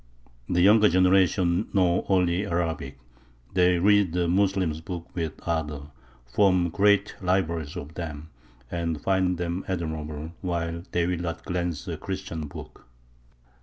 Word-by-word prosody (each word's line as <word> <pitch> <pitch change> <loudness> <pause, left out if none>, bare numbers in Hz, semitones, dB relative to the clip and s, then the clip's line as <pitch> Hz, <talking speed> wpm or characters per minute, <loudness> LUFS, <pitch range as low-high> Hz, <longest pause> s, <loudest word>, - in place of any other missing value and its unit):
The 90 - +2
younger 105 +3 +6
generations 90 0 +3
know 90 -2 +3
only 90 -1 +2
Arabic; 80 -6 -2 0.6
they 90 -1 +4
read 100 -1 +4
the 90 -1 +1
Moslems' 95 -3 +1
books 85 0 -7
with 80 -3 -2
ardour, 75 -3 -3 0.3
form 90 +6 +3
great 100 +4 +3
libraries 85 -5 -1
of 75 +2 -7
them, 80 -2 -7 0.4
and 85 -3 -2
find 95 0 +1
them 85 +2 -3
admirable; 80 -3 -4
while 85 -2 -2
they 85 -1 +1
will 90 -1 -1
not 85 -1 -5
glance 90 -3 -3
at - - -3
a - - -5
Christian 95 -5 -5
book. 70 - -11
85 Hz, 135 wpm, -26 LUFS, 80-95 Hz, 0.6 s, younger